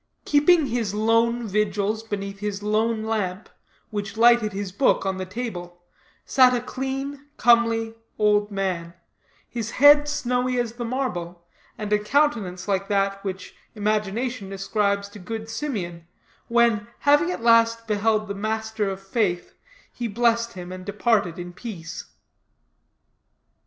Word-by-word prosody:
Keeping 300 +2 +4
his 230 -5 -2
lone 230 +2 +2
vigils 210 +1 0
beneath 200 -2 -5
his 205 -1 -4
lone 220 +1 +1
lamp, 210 -3 -2 0.4
which 205 0 -4
lighted 235 -2 +5
his 195 -1 -4
book 230 +1 +2
on 190 -1 -1
the 185 - -4
table, 175 -5 -6 0.4
sat 255 -2 +5
a - - +1
clean, 270 +3 -5
comely, 230 -1 +3 0.2
old 210 -1 +3
man, 185 -4 -3 0.5
his 230 -2 -4
head 290 +3 +6
snowy 250 -3 0
as 235 -2 -2
the 240 0 -5
marble, 180 -9 -4 0.3
and 210 -1 -2
a 210 - +4
countenance 210 -7 0
like 195 -1 0
that 195 -1 0
which 190 -1 -6 0.2
imagination 215 +1 -2
ascribes 200 +1 0
to 205 - -12
good 220 +4 -6
Simeon, 180 - -4 0.4
when, 235 -2 +2
having 290 +4 +4
at 360 - -4
last 230 0 +4
beheld 215 0 +1
the 200 - -3
Master 220 0 -2
of 190 0 -5
Faith, 195 -3 -1 0.4
he 240 - -3
blessed 235 +1 +1
him 180 -1 -8
and 185 0 -7
departed 200 -3 0
in 175 0 -7
peace. 180 -6 -7
215 Hz, 135 wpm, -24 LUFS, 195-235 Hz, 0.5 s, head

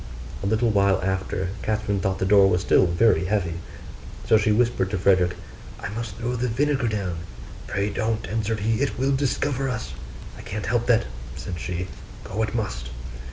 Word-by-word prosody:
A 100 - -1
little 110 +2 +2
while 100 -2 +3
after, 95 -1 -1
Catherine 105 -2 0
thought 95 0 0
the 95 - 0
door 100 0 +6
was 90 -1 +2
still 95 - +4
very 95 +3 +3
heavy: 90 -4 0 0.7
so - - +6
she 105 0 +4
whispered 115 -4 +2
to 100 - -1
Frederick, 90 -1 +3 0.4
'I - - -5
must 115 +2 -5
throw 120 +2 -2
the 125 +1 0
vinegar 135 +2 +1
down.' 100 -6 -2 0.5
'Pray 100 +1 -1
don't,' 110 -1 -1
answered 110 +1 -1
he, 110 +3 +1
'it 140 - 0
will 135 +2 +2
discover 135 0 0
us.' 115 -3 -4 0.5
'I - - -7
can't 105 +1 -5
help 120 -1 0
that,' 115 -2 +4 0.3
said 90 -2 -5
she, 90 +2 -3 0.4
'go 105 +3 -3
it 110 +1 -1
must. - - -3
105 Hz, 180 wpm, -24 LUFS, 95-115 Hz, 0.7 s, door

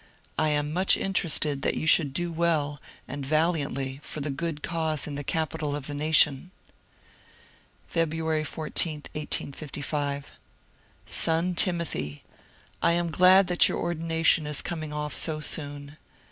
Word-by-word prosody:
I 155 - +2
am 150 0 -1
much 185 +3 +4
interested 155 -7 0
that - - 0
you - - -3
should 155 -2 +5
do 175 +5 -2
well 155 -4 0 0.3
and 140 +1 -6
valiantly 140 -3 -1
for 155 - -6
the 145 0 -3
good 150 +1 -4
cause 160 -3 -1
in 145 - -5
the 145 +1 -4
capital 155 -1 -2
of 145 -2 -5
the 145 - -5
nation. 150 +1 +3 1.4
Feb. 160 -2 0
14, 155 +1 0 0.2
1855. 145 -1 -3 0.4
— - - -34
Son 165 +3 +1
Timothy, 170 - -1 0.3
— - - -30
I 170 - +3
am 170 -1 0
glad 185 +3 +6
that 180 0 +5
your - - -2
or 175 - -1
dination 165 -1 +1
is 150 -1 +1
coming 155 -3 -5
off 150 -1 -4
so 155 -1 +2
soon. 145 -1 -3
155 Hz, 145 wpm, -26 LUFS, 145-165 Hz, 1.4 s, glad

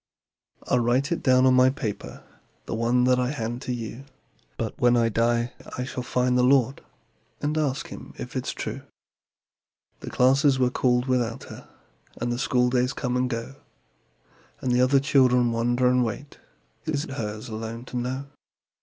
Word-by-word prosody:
"I'll 125 - +1
write 125 +5 +1
it 170 - -1
down 130 -1 +4
on 130 - +5
my 130 0 +6
paper, 110 -6 -5 0.4
(The - - -5
one 120 +2 +2
that 125 0 +3
I 125 0 0
hand 120 -3 -4
to - - -4
you) 120 +2 -6 0.5
But - - -3
when 120 0 +4
I 115 -1 +3
die 115 +2 +1 0.2
I 125 - -2
shall 125 0 -5
find 125 0 0
the 125 - +4
Lord, 135 0 +3 0.6
And 150 +1 -1
ask 140 -3 -1
Him - - -10
if - - -7
it's - - -2
true." - - -5 1.2
The - - -7
classes 135 +2 +3
were 125 -1 +2
called 125 -1 +1
without 125 -3 -1
her, - - -13 0.5
And 120 +1 -1
the 120 - -2
schooldays 125 +1 +1
come 125 -2 -2
and 125 0 +1
go, 115 +3 -5 1.0
And 125 -1 0
other 135 +2 +4
children 125 -3 +3
wonder 120 +2 +1
and 125 0 +3
wait 130 +5 -5 0.5
It 155 -1 -1
is 140 - -1
hers 110 -5 -5
alone 115 +1 -6
to 125 - -6
know. 130 +3 -3
125 Hz, 170 wpm, -25 LUFS, 120-130 Hz, 1.2 s, my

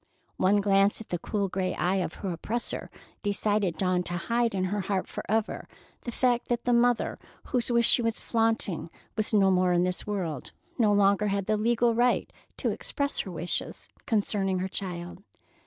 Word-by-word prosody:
One 200 +2 +3
glance 195 0 +3
at 225 - -10
the 175 - -2
cool 200 +1 -1
gray 185 0 -2
eye 185 +2 +1
of 180 -3 -2
her 190 - -1
oppressor 225 +8 -3 0.3
decided 205 -3 0
Dawn 185 0 +1
to 175 - -2
hide 230 +4 0
in 185 - 0
her 200 +2 -1
heart 190 -1 -1
forever 220 +1 -2 0.4
the 240 - -3
fact 245 0 +1
that 240 -1 -1
the 245 - +3
mother 240 0 +2 0.2
whose 250 -2 -1
wish 235 -1 +4
she - - +5
was 230 -1 -1
flaunting 225 -7 0 0.3
was 215 -1 0
no 195 -3 +4
more 180 -1 +3
in 175 0 +3
this 180 +2 -2
world, 175 -10 -3 0.3
nor 210 -3 +4
longer 200 +1 +3
had 200 -1 -1
the 215 - +1
legal 235 +2 +2
right 245 +2 +1 0.2
to - - 0
express 280 0 -2
her 190 - -3
wishes 175 +1 -3 0.2
concerning 200 -3 +1
her 185 +1 -1
child. 180 -1 -5
200 Hz, 180 wpm, -28 LUFS, 185-230 Hz, 0.4 s, she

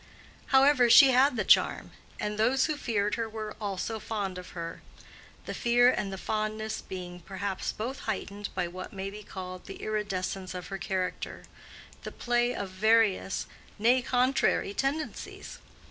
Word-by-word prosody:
However, 270 -2 +5
she 270 +3 +9
had 260 +1 +4
the 215 - 0
charm, - - +4 0.3
and 210 0 -2
those 255 +4 +3
who 310 - -1
feared 210 -7 -1
her 230 -1 -1
were 215 -1 -6
also 205 +2 -3
fond 200 -4 -3
of 180 - -10
her; 165 0 -5 0.6
the - - -4
fear 245 +1 +4
and 200 -5 -2
the 190 - -5
fondness 215 +2 -2
being 180 -1 -7
perhaps 190 +2 -3
both 250 +6 -5
heightened 205 -1 -4
by 180 -2 0
what 185 +5 -8
may 195 0 -4
be 210 +1 -9
called 185 -2 -8
the 195 - -7
iridescence 195 -3 -3
of 180 -1 -6
her 195 - -5
character—the 185 -1 -6
play 240 0 +1
of 195 -2 -4
various, 215 -1 +2 0.3
nay, 240 +4 +4
contrary 250 -4 +2
tendencies. 285 +6 -3
210 Hz, 150 wpm, -29 LUFS, 190-240 Hz, 0.6 s, she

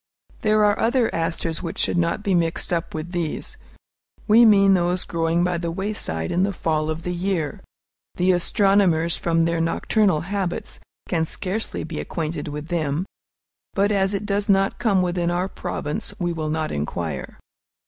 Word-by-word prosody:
There 215 -1 +3
are 205 0 +2
other 235 +1 +2
asters 165 -1 -2
which 165 -2 -5
should - - +1
not 170 +4 0
be 200 -3 +1
mixed 170 0 0
up 165 -1 -2
with 155 +2 -5
these, 170 -4 -3 0.7
we 230 +2 +7
mean 200 -3 +6
those 180 0 +1
growing 165 +1 0
by 180 -1 0
the 170 0 -2
wayside 165 - -3
in 175 - +1
the 200 +1 +2
fall 155 -4 -1
of 160 +1 -3
the 180 - -2
year. 175 -4 -2 0.5
The 180 +1 +3
astronomers, 180 -2 +3
from 165 -1 +1
their 165 0 +1
nocturnal 165 +1 +2
habits, 190 0 -3 0.3
can 165 -2 0
scarcely 200 +7 -3
be 160 0 -5
acquainted 155 -2 -4
with 150 +2 -6
them; 160 -1 -1 0.7
but 200 +1 +2
as 195 0 +1
it 200 - -3
does 205 0 -1
not 195 0 +2
come 195 -5 +2
within 175 -1 0
our 175 +2 0
province, 150 -5 -4
we 175 -1 -1
will 155 -2 -3
not 155 0 -1
inquire. 75 -1 -4
175 Hz, 170 wpm, -23 LUFS, 165-195 Hz, 0.7 s, we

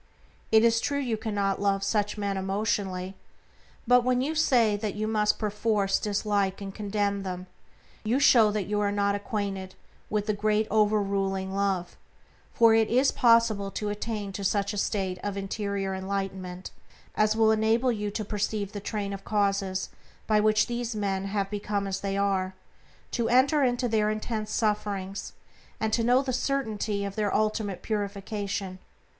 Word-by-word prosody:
It 220 0 +6
is 230 0 +4
true 285 - -1
you 250 -5 -1
cannot 205 -3 -1
love 195 -1 +1
such 210 0 0
men 200 -1 -1
emotionally, 190 -1 -2 0.7
but 245 +1 +5
when 250 0 +2
you 280 +5 0
say 245 -9 +3
that 205 -1 -3
you 215 +1 -2
must 210 -1 +2
perforce 210 -2 0
dislike 205 -2 0
and 195 -1 -6
condemn 205 -1 -1
them 185 -1 -5 0.6
you 230 +5 +1
show 235 -6 +6
that 210 -1 -1
you 210 +2 -1
are 205 -1 +1
not 200 0 +1
acquainted 200 -2 -3 0.3
with 210 -1 0
the 215 - 0
Great 215 +1 +1
over 215 0 +3
ruling 195 -1 -1
Love; 195 -3 -1 0.5
for 230 -1 +5
it 225 -1 +3
is 255 +4 +3
possible 230 -4 +3
to 210 +1 -3
attain 210 -1 -4
to 200 +1 -6
such 200 +1 0
a - - -5
state 190 -3 -1
of 205 -1 -3
interior 195 -1 -2
enlightenment 190 -1 -4 0.4
as 215 0 +2
will 220 0 +4
enable 220 +3 +2
you 210 -2 -2
to 215 +1 -4
perceive 205 -1 -2
the 205 - -5
train 200 -1 -3
of 195 0 -7
causes 195 -2 0 0.4
by 215 -1 +3
which 215 0 +3
these 240 -1 -3
men 195 -2 -1
have 195 0 -2
become 205 -1 -2
as 195 0 -2
they 195 0 -2
are, 190 -2 0 0.6
to 235 -2 0
enter 275 +4 +4
into 245 -1 +1
their 215 -2 +2
intense 215 0 -3
sufferings, 205 -3 -2 0.5
and 220 -1 -1
to 230 - +2
know 250 +3 +4
the 260 -2 -2
certainty 220 -6 -1
of 200 0 -5
their 210 -2 0
ultimate 215 -3 -1
purification. 200 -2 -3
205 Hz, 165 wpm, -27 LUFS, 195-220 Hz, 0.7 s, It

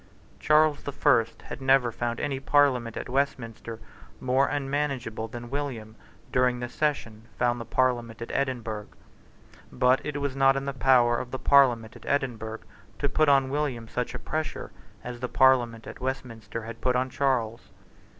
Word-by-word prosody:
Charles 155 -1 +3
the 145 - -5
First 125 -5 +2
had - - -8
never 130 -2 +4
found 120 +1 -3
any 135 -2 -2
parliament 135 -5 +2
at - - -5
Westminster 120 -4 -2 0.4
more 130 +2 +2
unmanageable 135 -5 -2
than 120 +1 -9
William, 125 -7 -4 0.4
during 125 -1 +2
this 120 0 -6
session, 115 -7 -2
found 120 -1 +1
the - - -6
parliament 120 -2 0
at 115 - -6
Edinburgh. 115 -6 -2 0.8
But 130 +3 +2
it 145 -1 -3
was 140 -2 -2
not 135 0 +4
in 135 - -3
the 140 - -3
power 120 -2 +4
of 125 - -6
the 130 - -4
parliament 125 -6 +4
at - - -13
Edinburgh 115 -6 -2 0.4
to 140 - 0
put 155 +2 +3
on 135 -1 +4
William 135 -6 -2
such 125 +2 -3
a - - -2
pressure 155 0 -4 0.3
as 125 -1 -7
the 125 0 -3
parliament 120 -3 +3
at - - -10
Westminster 120 -3 -5
had 115 +1 -8
put 125 -1 +1
on 130 +1 0
Charles. 120 -5 -1
125 Hz, 165 wpm, -27 LUFS, 115-140 Hz, 0.8 s, never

